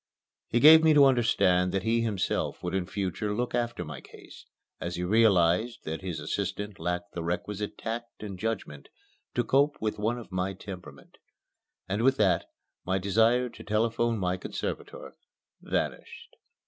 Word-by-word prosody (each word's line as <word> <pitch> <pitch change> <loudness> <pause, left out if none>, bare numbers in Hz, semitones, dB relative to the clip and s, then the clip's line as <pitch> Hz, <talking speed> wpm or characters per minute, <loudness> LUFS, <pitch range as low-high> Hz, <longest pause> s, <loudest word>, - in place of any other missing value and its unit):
He 120 - +1
gave 160 +4 +9
me 160 -1 +5
to 145 -1 +8
understand 100 -8 +3
that 95 -1 0
he 115 +2 +2
himself 105 -5 -2
would 90 0 -3
in 95 -2 -1
future 100 +2 -2
look 125 +2 -2
after 120 -7 -2
my 75 -3 -8
case, - - -15 0.3
as 85 +1 -4
he 90 - -3
realized 105 +1 +3
that 80 +2 -5
his 90 -4 -4
assistant 100 +5 -4
lacked 90 0 -3
the 85 - -4
requisite 100 +5 -3
tact 115 0 -6
and 100 -3 -7
judgment 110 -10 -4 0.5
to 120 - +2
cope 140 +5 +2
with 110 -1 -2
one 110 +4 0
of 115 -5 -10
my 95 +1 -1
temperament 95 -1 -11 0.7
and 100 +3 -1
with 135 +2 +3
that, 95 -5 +2 0.4
my 95 +1 0
desire 115 +6 +3
to 110 -1 -12
telephone 115 +2 0
my 90 -2 -1
conservator - - -6 0.5
vanished. - - -4
105 Hz, 160 wpm, -28 LUFS, 90-115 Hz, 0.7 s, gave